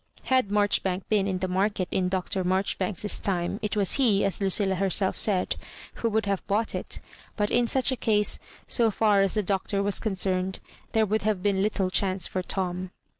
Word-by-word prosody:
Had 255 -5 +1
Marchbank 200 -2 0
been 205 -2 +2
in 190 -2 -1
the 185 +1 -2
market 190 0 0
in 180 -1 0
Dr. 185 0 -2
Marjoribanks's 190 +2 0
time, 180 +1 -1
it 210 0 -2
was 200 +3 +3
he, 220 -8 +3
as 195 +1 -1
Lucilla 195 0 +2
herself 190 0 +2
said, 190 -4 0 0.4
who 230 - +1
would 220 0 0
have 200 -2 -1
bought 215 +3 0
it; - - -4 0.4
but 210 -1 -1
in 240 -1 +2
such 265 +2 +3
a - - 0
case, 210 -3 +2 0.3
so 230 -2 +3
£»* 205 -1 +3
as 195 - 0
the 210 - +1
Doctor 195 +1 -1
was 200 0 +2
concerned, 190 -2 -1 0.4
there 220 -1 +3
would 215 +1 0
have 205 -3 -1
been 200 -2 +1
little 195 -2 0
chance 185 -2 +1
for 185 - -1
Tom. 185 0 -3
195 Hz, 190 wpm, -26 LUFS, 185-210 Hz, 0.4 s, was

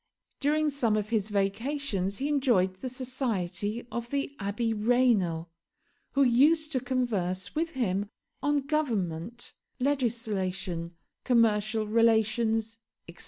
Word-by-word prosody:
During 300 +1 +2
some 235 -6 +1
of 210 0 -2
his 220 -3 0
vacations 200 0 -1
he 275 - -1
enjoyed 245 -11 +2
the 255 - -3
society 240 -4 -2
of 235 +1 -4
the 280 +1 -2
Abby 215 +3 -1
Raynal, 210 -8 +2 0.6
who 275 - +4
used 300 +6 +4
to 260 - +1
converse 205 -8 -1
with 330 +1 -1
him 205 -6 -1 0.3
on 290 0 +2
government, 235 - -2 0.3
legislation, 200 -10 -1 0.3
commercial 220 -3 +2
relations, 225 0 +2 0.3
etc. 170 - -12
230 Hz, 115 wpm, -28 LUFS, 200-260 Hz, 0.6 s, who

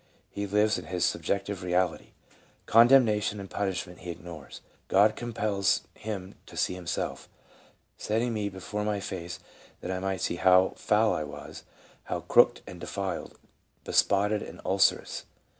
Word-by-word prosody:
He 100 0 -3
lives 105 +1 +2
in 90 - -10
his 90 +1 0
sub - - -1
jective 100 -1 -2
reality; 90 -1 -1 0.5
condemnation 115 -3 +5
and 100 - -7
punishment 95 -2 -3
he 90 - -8
ignores. 85 -4 -9 0.3
God 105 +3 +4
compels 105 -4 0
him 100 -3 -6
to - - -11
see - - +1
himself. 90 -2 -4 0.3
..." - - -27 0.3
setting 115 +3 -1
me 105 -2 -1
be 95 -1 -10
fore 105 +3 -3
my 105 -1 -1
face, 90 -3 -6 0.4
that 90 - -4
I 95 - -2
might 95 -1 -2
see 85 - -1
how 90 +1 +5
foul 110 0 +2
I 75 - -1
was, 75 - -9 0.4
how - - -3
crooked - - +4
and 90 - -10
defiled, 95 -4 -4 0.5
bespotted 105 +1 +2
and - - -9
ulcerous. - - +2
100 Hz, 155 wpm, -28 LUFS, 90-105 Hz, 0.5 s, condemnation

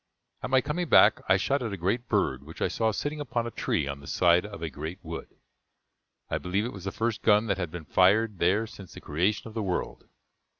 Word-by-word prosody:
At - - -4
my 130 0 +4
coming 155 +5 -3
back, - - +6
I 95 - +6
shot 140 +8 0
at 115 -3 -3
a 100 - -4
great 110 +8 -1
bird 65 0 +1
which 80 +4 -12
I - - +1
saw 110 -1 +1
sitting 145 +7 -3
upon 120 -4 -2
a 120 - -4
tree 70 - -1
on 70 0 -4
the 70 - -13
side 90 +2 +3
of 100 -4 -9
a 80 - -2
great 80 +6 -6
wood. 80 0 -6 1.0
I - - -2
believe 95 +4 -1
it 120 - -5
was 100 -2 -9
the 100 - -2
first 115 +1 -2
gun 105 0 +4
that 100 -3 -1
had 90 -3 -2
been 85 -1 -8
fired 100 +3 +3
there 95 +6 +2
since 100 -4 -12
the - - -8
creation 90 +10 -1
of 110 - -10
the 110 - -2
world. 95 -3 -3
100 Hz, 240 wpm, -27 LUFS, 85-115 Hz, 1.0 s, back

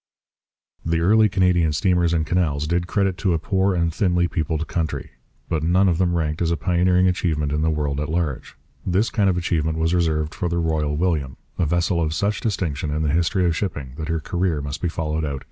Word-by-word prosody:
The 80 0 0
early 105 +5 +4
Canadian 90 -4 +2
steamers 90 +1 +2
and 80 -2 +1
canals 75 -3 0
did 85 +2 -1
credit 95 -1 0
to 95 -4 +1
a - - +2
poor 95 +3 0
and 85 -2 0
thinly 90 -2 +1
peopled 80 -1 -2
country. 80 -3 -3 0.4
But 80 -3 -1
none 90 +5 +3
of 85 -2 +1
them 90 -2 +2
ranked 80 -1 -1
as 85 - +1
a 85 - 0
pioneering 90 +1 +2
achievement 80 -5 0
in 75 +1 0
the 80 - +2
world 75 -2 -1
at 75 0 -3
large. 80 -6 -2 0.3
This 95 +5 +1
kind 100 -4 +2
of 90 - 0
achievement 80 -2 -1
was 80 +1 +1
reserved 80 -3 0
for 85 +1 -2
the 85 - -1
Royal 80 -3 0
William, 75 -6 -1 0.2
a 85 - +2
vessel 85 +2 +1
of 80 -1 -1
such 100 +3 -1
distinction 80 -9 -2
in 75 +2 -1
the 75 -2 0
history 85 +3 +1
of 85 -1 +1
shipping 75 -10 -4
that 80 -1 -4
her 80 0 0
career 85 0 -1
must 70 0 -5
be 90 - 0
followed 80 -1 -2
out 75 - -1
in - - -3
detail. 70 - -5
85 Hz, 225 wpm, -22 LUFS, 75-90 Hz, 0.4 s, early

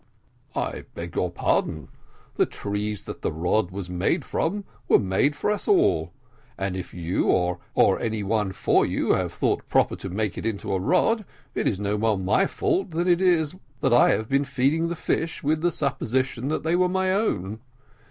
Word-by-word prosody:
"I - - -3
beg 85 0 -6
your 90 - +1
pardon; 80 -3 -1 0.4
the - - +2
trees 105 0 -3
that - - -8
that - - -1
rod 90 +5 0
was 95 -1 -6
made 95 - 0
from 200 +5 -1 0.2
were - - +6
made 100 +10 +1
for 205 - 0
us 210 - -2
all, 400 -1 +3 0.5
and 95 -1 -2
if 90 -2 -6
you, 85 +1 -1
or 90 0 +2
any 110 -2 -2
one 105 -1 0
for 95 - +2
you, - - 0
have - - 0
thought - - -1
proper - - +3
to 95 - -6
make 100 0 -2
it - - -6
into 100 -3 -3
a 95 - +1
rod, 220 - +2 0.3
it - - 0
is 95 - 0
no 105 0 -1
more 110 -1 +2
my 100 - +2
fault 380 - 0
than 170 +2 -1
it 175 0 +3
is 170 -5 +3 0.3
that - - +3
I 120 - +6
have 110 - +1
been 135 +2 +2
feeding 140 +4 +1
the 170 - -3
fish 160 0 -2
with 155 +2 +1
the 175 +1 +2
supposition 130 -3 -1
that 155 - -1
they 165 +2 +1
were 180 0 +3
my 190 0 +1
own. 110 - -1
115 Hz, 190 wpm, -25 LUFS, -, 0.5 s, were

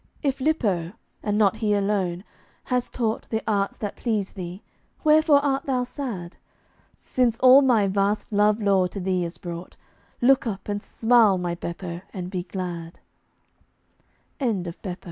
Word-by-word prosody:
If 275 -2 -1
Lippo 205 - 0 0.3
(and 210 -1 -1
not 210 0 +3
he 215 -2 +1
alone) 195 -3 0 0.4
has 250 -1 -1
taught 225 -3 -2
The 220 -1 -2
arts 200 -3 0
that 205 -2 -4
please 215 -5 -1
thee, 180 0 -7 0.4
wherefore 305 -2 +5
art 275 -1 0
thou 255 -2 +1
sad? 235 - -6 0.6
Since 245 -3 0
all 255 +2 +8
my 240 -7 +4
vast 200 +2 0
love 210 +1 +3
lore 195 -3 +3
to 195 - -7
thee 185 -1 0
is 170 0 -5
brought, 175 -1 -8 0.4
Look 260 0 +4
up 200 -3 -5
and 205 0 -2
smile, 225 -3 +3
my 175 -1 -2
Beppo, 170 0 -6
and 180 -1 -5
be 185 -2 -2
glad. 175 -2 -6 1.4
TIRED. 190 - -1
205 Hz, 145 wpm, -24 LUFS, 180-245 Hz, 1.4 s, all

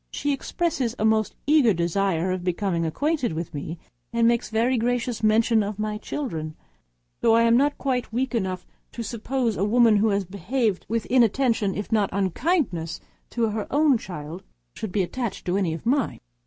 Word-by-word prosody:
She 290 0 -1
expresses 275 -4 -2
a 220 - 0
most 220 -1 +2
eager 285 -9 +4
desire 175 +1 0
of 185 -1 -3
being 180 -2 -1
acquainted 285 - -1
with 165 +1 -5
me, 155 +3 -5 0.3
and 230 0 +3
makes 235 -1 +1
very 230 +4 +1
gracious 240 0 -1
mention 220 +1 +3
of 205 0 -3
my 210 0 -3
children 160 - -4 0.6
but - - +2
I 230 +1 +5
am 230 0 +5
not 285 +3 +2
quite 255 -4 -2
weak 255 +3 -1
enough 190 -5 -2 0.3
to 235 - -5
suppose 235 0 -2
a - - 0
woman 225 0 +4
who 215 +2 +3
has 200 -1 0
behaved 200 +3 -1
with 230 0 -1
inattention, 235 -4 +2
if 205 - -5
not 210 -3 +2
with - - -3
unkindness, 190 - 0 0.3
to 230 -2 0
her 210 0 -3
own 285 -4 +3
child, 165 -1 -7 0.3
should 215 - -5
be 195 0 +1
attached 230 +2 -4
to 180 0 0
any 190 -4 +1
of 165 - -10
mine. 265 +1 +1
220 Hz, 180 wpm, -24 LUFS, 190-245 Hz, 0.6 s, I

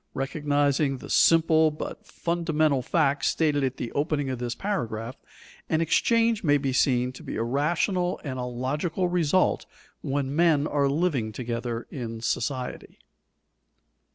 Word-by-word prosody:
Recognizing 145 0 0
the - - -9
simple 160 -1 +5
but 150 - -7
fundamental 155 -5 0
fact 145 +1 +1
stated 150 -3 +1
at 130 -1 -1
the 115 - -4
opening 145 -2 -1
of 130 - -4
this 120 -1 -3
paragraph, 120 - -3 0.5
an 160 - +2
exchange 225 +7 +2
may 145 -3 +4
be 135 -2 -2
seen 125 -2 +2
to 130 - -12
be - - -6
a 115 - -1
rational 175 - 0
and 130 -4 -4
a 125 - -2
logical 150 +9 -2
result 175 0 +1 0.3
when 140 0 -2
men 160 -3 +3
are 145 -2 +1
living 140 -7 0
together 120 0 -4
in 115 -4 -5
society. 125 +2 -3
145 Hz, 140 wpm, -26 LUFS, 125-160 Hz, 0.5 s, simple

